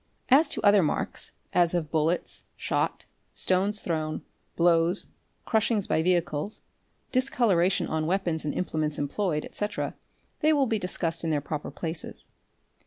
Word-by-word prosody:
As 285 Hz, +4 st, +6 dB
to -, -, 0 dB
other 205 Hz, -1 st, +6 dB
marks, 155 Hz, -, -1 dB, 0.2 s
as 175 Hz, 0 st, +3 dB
of 155 Hz, -4 st, -2 dB
bullets, 160 Hz, +2 st, 0 dB
shot, -, -, -1 dB, 0.3 s
stones 195 Hz, +3 st, +2 dB
thrown, 155 Hz, -2 st, -2 dB, 0.3 s
blows, 170 Hz, +2 st, +3 dB, 0.4 s
crushings 220 Hz, -2 st, +2 dB
by 160 Hz, -, +2 dB
vehicles, 175 Hz, +1 st, 0 dB, 0.5 s
discoloration 225 Hz, -9 st, +2 dB
on 155 Hz, 0 st, -1 dB
weapons 175 Hz, -3 st, 0 dB
and 150 Hz, -, -1 dB
implements 155 Hz, -4 st, -1 dB
employed, 150 Hz, +2 st, -1 dB
etc., 210 Hz, 0 st, -3 dB, 0.5 s
they 310 Hz, +1 st, +4 dB
will 285 Hz, -2 st, +3 dB
be 225 Hz, -3 st, 0 dB
discussed 170 Hz, -3 st, 0 dB
in 165 Hz, -, -1 dB
their 150 Hz, -2 st, +2 dB
proper 150 Hz, +1 st, -5 dB
places. 160 Hz, -1 st, -4 dB
175 Hz, 135 wpm, -27 LUFS, 160-205 Hz, 0.5 s, As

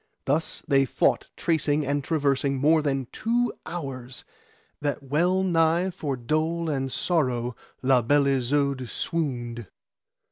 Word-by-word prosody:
Thus 155 Hz, +4 st, -1 dB
they 135 Hz, -2 st, +4 dB
fought -, -, +1 dB
tracing 155 Hz, -3 st, +1 dB
and 140 Hz, +1 st, 0 dB
traversing 140 Hz, -2 st, +1 dB
more 155 Hz, +4 st, +4 dB
than 135 Hz, -3 st, -1 dB
two 235 Hz, +1 st, 0 dB
hours, 135 Hz, -7 st, -6 dB, 0.6 s
that 145 Hz, -1 st, -2 dB
well 175 Hz, +7 st, +1 dB
nigh 170 Hz, +1 st, +2 dB
for 145 Hz, -6 st, -3 dB
dole 160 Hz, +6 st, -1 dB
and 135 Hz, -2 st, -2 dB
sorrow 125 Hz, -8 st, 0 dB, 0.3 s
La 130 Hz, -1 st, +4 dB
Beale 145 Hz, +4 st, +3 dB
Isoud 135 Hz, 0 st, 0 dB
swooned. 120 Hz, -, -3 dB
145 Hz, 120 wpm, -26 LUFS, 130-160 Hz, 0.6 s, they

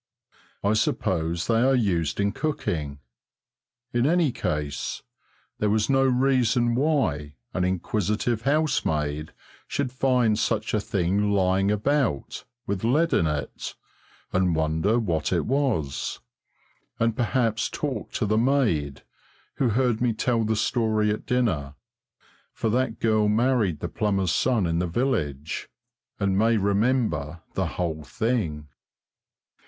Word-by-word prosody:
I 100 Hz, +1 st, +3 dB
suppose 85 Hz, -5 st, 0 dB
they 115 Hz, 0 st, +2 dB
are 135 Hz, +2 st, +4 dB
used 90 Hz, -, 0 dB
in 100 Hz, 0 st, +2 dB
cooking. 80 Hz, -, -2 dB, 1.0 s
In 120 Hz, +2 st, +2 dB
any 165 Hz, -3 st, +3 dB
case, 75 Hz, -, -3 dB, 0.6 s
there 105 Hz, -, +1 dB
was 110 Hz, +4 st, +1 dB
no 135 Hz, 0 st, +4 dB
reason 125 Hz, -2 st, +2 dB
why 115 Hz, -, 0 dB, 0.2 s
an 90 Hz, -, 0 dB
inquisitive 105 Hz, +5 st, -1 dB
housemaid 80 Hz, -, 0 dB, 0.4 s
should 140 Hz, -3 st, -2 dB
find 125 Hz, -4 st, +2 dB
such 110 Hz, -1 st, -1 dB
a 105 Hz, -, +3 dB
thing 100 Hz, -1 st, 0 dB
lying 95 Hz, 0 st, +2 dB
about, 110 Hz, -, 0 dB, 0.2 s
with 100 Hz, 0 st, -3 dB
lead 150 Hz, +9 st, +2 dB
in 80 Hz, -, +3 dB
it, 75 Hz, -1 st, -4 dB, 0.6 s
and 95 Hz, -3 st, +2 dB
wonder 80 Hz, +8 st, +1 dB
what 85 Hz, -9 st, -1 dB
it -, -, +1 dB
was, 125 Hz, -, -1 dB, 0.8 s
and 115 Hz, -1 st, +1 dB
perhaps 115 Hz, -2 st, 0 dB
talk 145 Hz, -3 st, -4 dB
to 110 Hz, -, 0 dB
the 110 Hz, +1 st, +2 dB
maid 110 Hz, -, +1 dB, 0.5 s
who 130 Hz, -, +2 dB
heard 120 Hz, 0 st, +1 dB
me 120 Hz, -2 st, +2 dB
tell 115 Hz, +1 st, 0 dB
the 110 Hz, 0 st, 0 dB
story 110 Hz, -1 st, +1 dB
at 105 Hz, -, -4 dB
dinner 85 Hz, -, 0 dB, 0.8 s
for 110 Hz, -, -1 dB
that 120 Hz, -1 st, 0 dB
girl 110 Hz, -2 st, +2 dB
married 110 Hz, -, +1 dB
the -, -, -2 dB
plumber's 95 Hz, -4 st, 0 dB
son 120 Hz, 0 st, +2 dB
in 85 Hz, 0 st, 0 dB
the 90 Hz, -, 0 dB
village, 80 Hz, -, -2 dB, 0.5 s
and 100 Hz, -1 st, +1 dB
may 115 Hz, +1 st, +3 dB
remember 100 Hz, -, 0 dB
the -, -, 0 dB
whole 80 Hz, -3 st, -2 dB
thing. 85 Hz, -8 st, -2 dB
110 Hz, 130 wpm, -25 LUFS, 85-125 Hz, 1.0 s, are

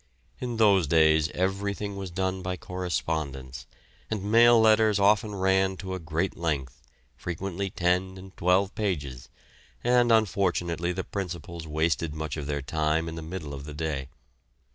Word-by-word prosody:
In 120 Hz, -2 st, -4 dB
those 100 Hz, -7 st, +4 dB
days 80 Hz, 0 st, +4 dB
everything 100 Hz, +2 st, -2 dB
was 95 Hz, -2 st, -5 dB
done 95 Hz, +1 st, -2 dB
by 90 Hz, 0 st, -3 dB
correspondence, 80 Hz, -8 st, -4 dB, 0.4 s
and 105 Hz, -3 st, -3 dB
mail 115 Hz, +3 st, +6 dB
letters 110 Hz, -1 st, +5 dB
often 105 Hz, +1 st, +3 dB
ran 95 Hz, 0 st, +2 dB
to 95 Hz, +1 st, -5 dB
a 95 Hz, -, -3 dB
great 85 Hz, +3 st, -2 dB
length, 70 Hz, -5 st, -3 dB, 0.3 s
frequently 95 Hz, +2 st, -4 dB
ten 90 Hz, +1 st, 0 dB
and 95 Hz, 0 st, -12 dB
twelve 95 Hz, +2 st, +2 dB
pages; 70 Hz, -, -3 dB, 0.5 s
and 120 Hz, -1 st, +4 dB
unfortunately 90 Hz, -5 st, +1 dB
the 95 Hz, +1 st, -3 dB
principals 85 Hz, -4 st, -6 dB
wasted 80 Hz, -1 st, 0 dB
much 80 Hz, -2 st, -4 dB
of 75 Hz, -3 st, -5 dB
their 70 Hz, -2 st, -2 dB
time 80 Hz, +2 st, 0 dB
in 80 Hz, -, -5 dB
the 80 Hz, -, -6 dB
middle 80 Hz, -2 st, -6 dB
of 70 Hz, 0 st, -7 dB
the 75 Hz, -1 st, -8 dB
day. 75 Hz, -4 st, -3 dB
90 Hz, 150 wpm, -27 LUFS, 80-100 Hz, 0.5 s, mail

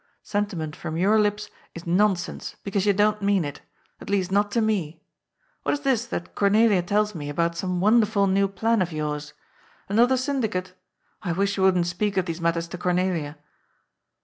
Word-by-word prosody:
Sentiment 190 Hz, -7 st, -3 dB
from 155 Hz, -, -5 dB
your 205 Hz, +5 st, +3 dB
lips 210 Hz, 0 st, 0 dB, 0.2 s
is 170 Hz, -, -8 dB
non 195 Hz, +4 st, +3 dB
sense, 175 Hz, -, -7 dB
because 200 Hz, 0 st, -1 dB
you -, -, +6 dB
don't 210 Hz, +1 st, +2 dB
mean 200 Hz, -4 st, +2 dB
it. 145 Hz, -, -7 dB, 0.4 s
At -, -, -10 dB
least, 195 Hz, -2 st, 0 dB
not 205 Hz, +1 st, +2 dB
to 235 Hz, -, +2 dB
me. 185 Hz, -8 st, -1 dB, 0.6 s
What -, -, 0 dB
is 290 Hz, -, -2 dB
this 255 Hz, -4 st, +1 dB
that 170 Hz, -7 st, -5 dB
Cornelia 205 Hz, -1 st, +3 dB
tells 210 Hz, +4 st, 0 dB
me 145 Hz, -5 st, -6 dB
about 170 Hz, +3 st, 0 dB
some 180 Hz, 0 st, -2 dB
wonderful 210 Hz, 0 st, +3 dB
new 195 Hz, +1 st, +2 dB
plan 220 Hz, +3 st, 0 dB
of 175 Hz, -1 st, -1 dB
yours? 150 Hz, -1 st, -4 dB, 0.5 s
Another 240 Hz, +6 st, +3 dB
syndicate? 220 Hz, -9 st, -2 dB, 0.5 s
I 175 Hz, -4 st, -2 dB
wish 200 Hz, +3 st, 0 dB
you 195 Hz, -, -2 dB
wouldn't 185 Hz, -2 st, +3 dB
speak 195 Hz, +3 st, -2 dB
of 185 Hz, -, +2 dB
these 170 Hz, -1 st, -5 dB
matters 170 Hz, 0 st, 0 dB
to 175 Hz, -, -7 dB
Cornelia.' 180 Hz, -4 st, -1 dB
195 Hz, 180 wpm, -24 LUFS, 170-210 Hz, 0.6 s, you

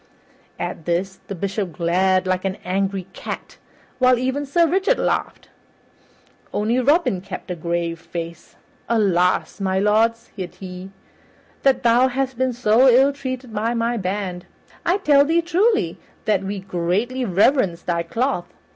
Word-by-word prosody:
At 160 Hz, -, -5 dB
this, 180 Hz, +3 st, -1 dB
the 200 Hz, -, -5 dB
Bishop 195 Hz, -1 st, -3 dB
glared 185 Hz, +3 st, +2 dB
like 185 Hz, 0 st, 0 dB
an 190 Hz, -1 st, -1 dB
angry 195 Hz, 0 st, -1 dB
cat, -, -, -7 dB, 0.4 s
while 255 Hz, -1 st, +5 dB
even 260 Hz, +3 st, -2 dB
Sir 340 Hz, +5 st, +3 dB
Richard 385 Hz, +9 st, +2 dB
laughed; -, -, -2 dB, 1.0 s
only 225 Hz, +4 st, +1 dB
Robin 280 Hz, -, +2 dB
kept 190 Hz, 0 st, -7 dB
a -, -, -2 dB
grave 170 Hz, 0 st, -2 dB
face. 170 Hz, -1 st, -7 dB, 0.3 s
"Alas! 190 Hz, -5 st, +2 dB
my 190 Hz, -1 st, 0 dB
lord," 215 Hz, +3 st, +3 dB
said 195 Hz, -5 st, -9 dB
he, 185 Hz, 0 st, -8 dB, 0.7 s
"that 270 Hz, -2 st, +3 dB
thou 240 Hz, +2 st, +5 dB
hast 265 Hz, +1 st, -2 dB
been 260 Hz, +1 st, 0 dB
so 245 Hz, +2 st, +4 dB
ill 265 Hz, +3 st, +5 dB
treated 255 Hz, -3 st, -6 dB
by 225 Hz, +3 st, -1 dB
my 230 Hz, +1 st, 0 dB
band! 190 Hz, -3 st, -3 dB, 0.4 s
I 350 Hz, +3 st, +3 dB
tell 290 Hz, -7 st, +5 dB
thee 330 Hz, +3 st, +2 dB
truly 405 Hz, +6 st, +1 dB, 0.3 s
that 205 Hz, -3 st, +2 dB
we 195 Hz, +1 st, -4 dB
greatly 195 Hz, +8 st, -1 dB
reverence 195 Hz, -3 st, +2 dB
thy 170 Hz, -1 st, 0 dB
cloth. 205 Hz, +1 st, -2 dB
210 Hz, 145 wpm, -21 LUFS, 185-260 Hz, 1.0 s, while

